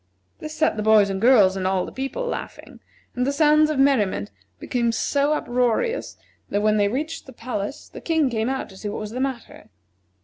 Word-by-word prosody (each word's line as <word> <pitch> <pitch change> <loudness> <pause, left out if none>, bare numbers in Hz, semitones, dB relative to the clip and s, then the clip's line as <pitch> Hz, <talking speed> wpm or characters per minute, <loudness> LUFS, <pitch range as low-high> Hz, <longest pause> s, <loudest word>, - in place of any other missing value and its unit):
This 310 0 -7
set 310 - +1
the - - -1
boys 210 -2 +4
and 190 0 -3
girls 215 -6 +5
and 185 -1 -1
all 190 -1 0
the - - -9
people 270 - -4
laughing, 485 - -7 0.4
and 250 - 0
the 275 - +1
sounds 305 +1 +4
of 305 - -1
merriment 210 - +2 0.3
became 235 - -1
so 280 +5 +1
uproarious 250 - -1 0.3
that 205 +1 -1
when 215 0 +3
they 205 -1 +3
reached 295 +10 -4
the - - -10
palace 235 +2 -5
the - - -11
King 320 -4 +1
came 230 -1 -1
out 265 0 -3
to 190 - -14
see 205 - -5
what 205 - -5
was 215 0 -6
the 250 - -5
matter. 265 -3 -5
245 Hz, 205 wpm, -23 LUFS, 210-280 Hz, 0.4 s, girls